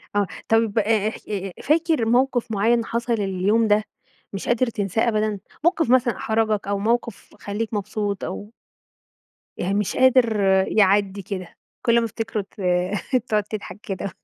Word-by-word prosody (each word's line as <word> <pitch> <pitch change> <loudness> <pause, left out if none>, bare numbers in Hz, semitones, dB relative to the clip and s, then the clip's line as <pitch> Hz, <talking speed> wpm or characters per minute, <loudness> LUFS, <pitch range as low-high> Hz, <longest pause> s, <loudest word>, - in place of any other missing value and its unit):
آه، 200 -2 +2 0.2
طيب 225 -1 +2
آآ 215 0 +2
اح - - -8
آآ 195 -2 -3
فاكر 315 -5 +2
موقف 245 0 +1
مُعيّن 225 +3 +2
حصل 235 +1 -1
اليوم 205 +2 +1
ده 210 0 +3 0.5
مش 195 - -5
قادر 240 +1 +2
تنساه 215 +1 -1
أبدًا؟ 215 -2 0 0.2
موقف 335 -6 +2
مثلًا 250 -2 +3
أحرجك 220 -2 0
أو 200 0 -1
موقف 230 +1 -2
خليك 215 +2 -4
مبسوط 205 -1 -2
أو 205 +3 -6 1.1
يعني 190 +3 -1
مش 205 -1 -1
قادر 255 -4 +4 0.3
يعدّي 200 -1 +2
كده 185 -2 -7 0.3
كُلّ 235 -1 +3
ما 230 - -1
تفتكره 225 -1 -3
ت 195 +1 -13 0.7
تقعد 210 -1 +2
تضحك 210 -1 -7
كده. 195 -1 -4
215 Hz, 150 wpm, -23 LUFS, 200-235 Hz, 1.1 s, قادر